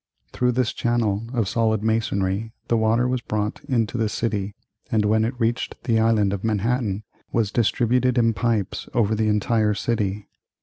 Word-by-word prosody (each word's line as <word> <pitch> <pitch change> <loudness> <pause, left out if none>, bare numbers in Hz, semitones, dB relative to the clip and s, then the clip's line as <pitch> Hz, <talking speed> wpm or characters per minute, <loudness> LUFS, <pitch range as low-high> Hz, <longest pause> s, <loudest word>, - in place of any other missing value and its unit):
Through 125 0 +1
this 125 -2 0
channel 115 -3 0
of 115 -6 0
solid 110 0 +1
masonry 110 -1 0 0.2
the 120 - +3
water 115 +2 +2
was 125 -1 -1
brought 105 -2 -3
into 120 -2 0
the 110 -1 +1
city, 105 -2 -2 0.4
and 110 -3 +2
when 110 +1 +3
it 120 +3 -3
reached 115 0 -1
the 115 -3 +2
Island 110 -3 +3
of 100 - -4
Manhattan 110 -1 0 0.3
was 110 -3 +1
distributed 125 +2 +2
in 115 -1 +3
pipes 110 -3 -1
over 110 -3 +2
the 110 0 +1
entire 105 0 +2
city. 105 -2 -2
110 Hz, 165 wpm, -23 LUFS, 105-120 Hz, 0.4 s, the